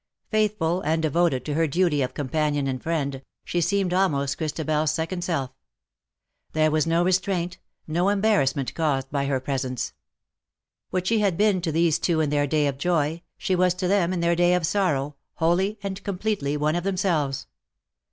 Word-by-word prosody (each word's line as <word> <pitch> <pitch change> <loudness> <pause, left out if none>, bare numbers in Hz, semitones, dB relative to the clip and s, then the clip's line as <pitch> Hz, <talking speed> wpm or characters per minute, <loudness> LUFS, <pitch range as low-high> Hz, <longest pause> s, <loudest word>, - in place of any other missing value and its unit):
Faithful 210 -5 +1
and 160 0 0
devoted 160 -3 +1
to 150 - -2
her 165 +2 +2
duty 160 -1 +1
of 130 - -2
companion 145 0 0
and 130 -2 -2
friend, 140 -5 -2 0.2
she 175 - -1
seemed 180 +2 +1
almost 145 -7 +1
Christa 155 0 -3
bel's 155 0 +1
second 165 +3 -2
self. 140 -7 -2 1.0
There 155 0 +3
was 155 +1 +1
no 165 +1 +3
restraint, 185 -1 0 0.3
no 175 +5 +1
embarrassment, 195 - +1
caused 135 -5 -1
by 140 -1 0
her 135 -2 +1
presence. 130 -2 -3 1.0
What 185 -1 -2
she 225 +3 +2
had 195 -5 +1
been 205 -3 +3
to 165 -2 -1
these 165 0 +2
two 170 -3 +1
in 150 -2 +1
their 145 -1 +2
day 150 +1 +2
of 140 -1 -2
joy, 165 -1 0 0.2
she 185 - 0
was 180 0 +2
to 180 0 -2
them 185 -2 +2
in 180 -2 -1
their 170 0 +2
day 175 +1 +4
of 180 -2 +1
sorrow, 150 -7 0 0.2
wholly 185 +6 +1
and 195 0 -5
com 200 -3 -3
pletely 180 -9 -1
one 150 +2 +1
of 175 - -1
themselves. 175 -8 0
165 Hz, 180 wpm, -25 LUFS, 145-185 Hz, 1.0 s, day